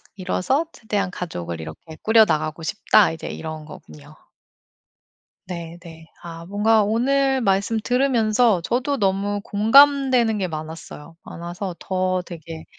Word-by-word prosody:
이뤄서 200 - -1
최대한 200 -4 -3
가족을 85 - -6
이렇게 80 - -10
꾸려나가고 165 -8 +2
싶다.' 160 - +3
이제 160 - -7
이런 155 -1 -7
거군요. 75 - -14 1.3
네네. 170 -2 -9 0.2
아 165 -1 -8
뭔가 210 +2 +3
오늘 265 +5 +1
말씀 200 0 +1
들으면서 230 -5 +2
저도 260 +9 -1
너무 200 -1 0
공감되는 250 0 +4
게 190 - -1
많았어요. 160 0 -8
많아서 175 +2 -6
더 185 -1 -1
되게 165 -1 -9
190 Hz, 270 characters per minute, -22 LUFS, 165-225 Hz, 1.3 s, 공감되는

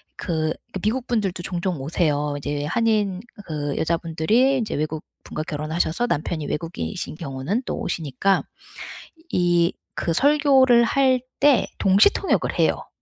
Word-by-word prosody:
그 155 -2 -1 0.2
그 190 - -3
미국 240 +4 -1
분들도 195 -7 -1
종종 180 -2 -2
오세요. 150 +1 0
어 145 0 -2
이제 145 0 -3
한인 210 -1 +1 0.3
그 145 -3 -3
여자분들이 170 +11 +1
인제 225 -3 -2
외국 155 +1 -3 0.2
분과 155 - -5
결혼하셔서 160 +8 -1
남편이 155 -4 -2
외국인이신 150 - -4
경우는 155 - -3
또 - - -3
오시니까 165 +5 0 0.9
이 175 -1 +2 0.3
그 165 - 0
설교를 270 - +5
할 260 0 +3 0.2
때 280 -3 +4
동시통역을 200 - +3
해요. - - +1
175 Hz, 295 characters per minute, -23 LUFS, 155-230 Hz, 0.9 s, 설교를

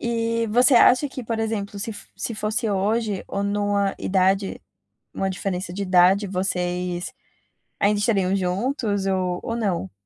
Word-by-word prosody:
Eh, 230 -1 -1
você 245 +4 +4
acha 255 +4 +6
que 260 -1 -7
por 225 0 -3
exemplo 210 -2 -3
se 220 +3 -4
f 210 - -10
se 230 - -3
fosse 215 +2 -1
hoje 205 +1 0
ou 200 - -2
numa 200 -1 0
idade 190 +1 +1 0.5
numa 195 - -1
diferença 185 -1 -3
de 200 - -4
idade 185 +2 +4
vocês, 180 -1 -2 0.7
ainda 205 +1 +3
estariam 195 -3 +1
juntos 200 +2 -1
ou 185 -2 0
ou 230 - -3
não? 185 - -1
200 Hz, 150 wpm, -23 LUFS, 185-225 Hz, 0.7 s, acha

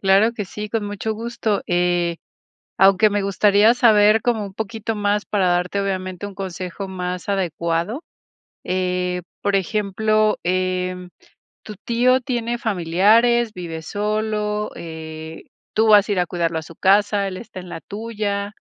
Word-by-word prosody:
Claro 195 +4 +4
que 210 -4 -4
sí, 210 +3 -7
con 220 -1 -2
mucho 205 +2 -3
gusto, 225 -2 -2
eh, 175 -1 +1 0.6
aunque 195 +2 +5
me 205 0 0
gustaría 205 +3 +4
saber 215 -2 +5
como 225 -4 0
un 195 - -9
poquito 220 +1 -4
más 205 0 0
para 195 -3 +1
darte, 180 +3 0
obviamente, 185 -1 -3
un 200 - -11
consejo 190 0 -5
más 180 0 -5
adecuado, 170 - -1 0.6
eh, 180 -1 -1 0.2
por 200 -1 +2
ejemplo, 215 +2 +1
em 185 0 -1 0.5
¿tu 210 - -9
tío 250 +2 +3
tiene 240 -2 -2
familiares, 220 +4 +3
vive 165 -3 -6
solo, 210 +2 -2
eh, 160 -1 -8 0.3
tú 220 +1 +3
vas 210 -1 +6
a - - +1
ir 195 - +1
a 180 - +2
cuidarlo 170 -2 -1
a - - -7
su 165 - -13
casa, 200 +2 +3
él 185 -1 -5
está 190 -4 -9
en 180 -1 -10
la 165 - -7
tuya? 205 -1 -4
200 Hz, 150 wpm, -21 LUFS, 180-215 Hz, 0.6 s, vas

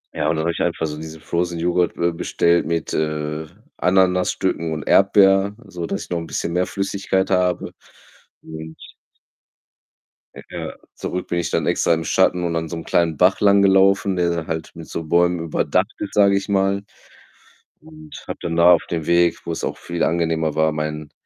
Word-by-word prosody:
Ja, - - 0
und 80 - +1
dann 80 - -1
habe 85 - +1
ich - - -5
einfach 85 -1 -1
so 75 -1 -4
diesen 80 0 -9
Frozen 85 +1 -2
Joghurt, 85 +1 0
äh, 85 0 +1
bestellt 85 0 +1
mit, 85 -1 -2
äh, 75 0 -2 0.3
Ananasstücken 90 -3 +1
und 75 -2 -4
Erdbeer, 95 0 +4
so 90 -3 -6
dass - - -3
ich - - -14
noch 85 - 0
'n 80 - -7
bisschen 85 - -3
mehr 90 +1 +1
Flüssigkeit 95 -1 -1
habe 90 -1 +1 0.7
und 80 0 -9 1.7
Ja, - - -6 0.2
zurück 90 - -4
bin 85 - -2
ich 85 - -3
dann - - 0
extra 85 - +2
im 80 - -1
Schatten 90 0 +2
und 85 -1 -1
an 80 0 -2
so 85 - -6
'nem 80 - -6
kleinen 80 -3 +1
Bach 90 +2 +3
langgelaufen, 100 -1 +4
der 85 -1 +1
da 85 -2 -3
halt 80 -1 -4
mit - - -10
so 85 - -5
Bäumen 85 +2 +2
überdacht 80 -2 0
überdacht - - -15
ist, - - -21
sage 100 -1 +5
ich 100 +1 -2
mal, 100 0 +1 1.0
und 155 -1 -13
habe - - -6
dann 85 -1 -3
da 85 +1 +7
auf 85 - +1
dem 80 -2 -3
Weg, 85 0 +2
wo's 85 -1 -4
auch - - -3
viel 85 0 -6
angenehmer 80 -2 0
war, 80 0 +2
meinen 75 -1 -4
85 Hz, 190 wpm, -21 LUFS, 80-95 Hz, 1.7 s, da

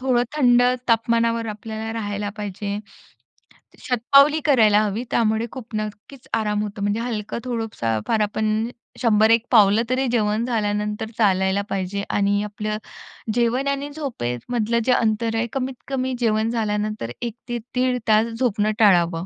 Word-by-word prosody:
थोडं 255 -2 +2
थंड 245 -3 +5 0.3
तापमानावर 230 0 +2
आपल्याला 220 +1 -5
राहायला 205 -2 -3
पाहिजे, 205 0 -4 1.0
शतपावली 275 +5 +4
करायला 220 -7 +5
हवी. 210 +3 -2
त्यामुळे 220 0 +1
खूप 240 -4 -9
नक्कीच 215 +5 -7
आराम 210 -1 0
होतो. 205 -1 -5
म्हणजे 205 +2 0
हलकं 220 -3 -3
थोडंसं 225 - -2
फार 225 - +2
आपण 215 +2 0 0.3
100-1 225 0 +4
पावलं 210 -1 +6
तरी 260 +1 +1
जेवण 215 -1 +1
झाल्यानंतर 210 -2 -2
चालायला 190 -2 +2
पाहिजे 195 +1 -2
आणि 205 0 +1
आपलं 210 +1 -4 0.6
जेवण 245 +3 +1
आणि 280 +1 -1
झोपेमधलं 235 - -2
जे 255 - +3
अंतर 225 -1 +1
आहे 225 +1 0
कमीत 265 -1 -2
कमी 260 -1 -1
जेवण 220 -1 +1
झाल्यानंतर 210 - -2
1 235 -2 -3 0.2
ते 240 - -1 0.2
1:30 250 0 +1
तास 220 +1 +4
झोपणं 220 -3 0
टाळावं. 175 -5 +4
220 Hz, 135 wpm, -22 LUFS, 210-240 Hz, 1.0 s, पावलं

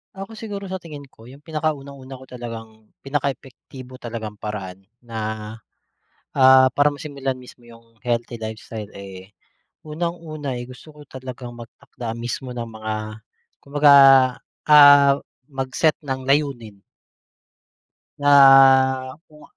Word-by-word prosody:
Ako 195 +3 -8
siguro 210 -2 -7
sa 190 - -4
tingin 150 -4 -10
ko 115 - -17
'yung 140 +4 -15
pinaka 155 -1 -2
unang-una 135 -1 -11
ko 130 - -13
talagang 115 -3 -10 0.2
pinaka 140 0 -2
epektibo 130 0 -14
talagang 110 -3 -7
paraan 95 -3 -6 0.2
na, 115 -2 -7 1.1
ah, 130 -1 +6
para 145 +4 +2
masimulan 140 -3 -5
mismo 125 -1 -16
'yung 115 -1 -19
healthy 120 -1 -3
lifestyle, 110 -1 -7
eh, 95 0 -11 0.5
unang-una, 155 -4 -5
eh, 120 - -7
gusto 130 +5 -14
ko 150 -1 -16
talagang 130 -2 -9
magtakda 115 0 -9
mismo 120 +2 -5
ng 120 -1 -5
mga 110 -1 -6 0.7
kumbaga, 145 0 +4 0.7
ah, 145 -2 +7 0.3
mag-set 135 +2 -1
ng 130 -2 -5
layunin. 130 -8 -1 1.4
Na 145 0 +2 1.0
kung 150 -1 -18
130 Hz, 120 wpm, -21 LUFS, 115-145 Hz, 1.4 s, ah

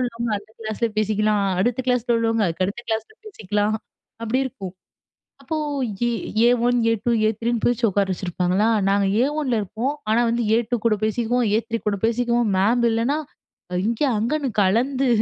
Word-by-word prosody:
உள்ளவங்க 235 -2 -2
அந்த 205 +1 -17
கிளாஸ்ல 220 +1 -2
பேசிக்கலாம், 215 -1 +1 0.2
அடுத்த 245 +5 0
கிளாஸ்ல 245 -1 +1
உள்ளவங்க 225 -1 +1
அதுக்கு 175 +2 -1
அடுத்த 200 +5 -5
கிளாஸ்ல 225 - -2
பேசிக்கலாம் 210 - -1 0.5
அப்படி 230 +3 0
இருக்கும். 195 -7 -8 0.7
அப்போ 310 +4 -3 0.5
ஏ - - +1 0.4
ஏ1, 245 0 +3 0.2
ஏ2, 230 +1 0 0.2
ஏ3ன்னு 230 +1 -1
பிரிச்சு 240 0 +1
உட்கார 200 0 +1
வச்சிருப்பாங்களா 185 +3 0 0.2
நாங்க 200 0 +2 0.2
ஏ1ல 290 -2 0
இருப்போம். 225 +8 -3 0.2
ஆனா 225 +2 +3
வந்து 235 +1 0
ஏ2 240 +1 0
கூட 225 -2 +3
பேசிக்கவும் 235 +2 0
ஏ3 230 0 -2
கூட 205 -1 +1
பேசிக்கவும், 235 -1 +1
மேம் 235 +5 +2
இல்லைன்னா 230 +6 0 0.7
இங்க 230 +4 -1 0.2
அங்கன்னு 275 +6 -1
கலந்து 255 +7 +1
230 Hz, 145 wpm, -22 LUFS, 210-245 Hz, 0.7 s, ஏ1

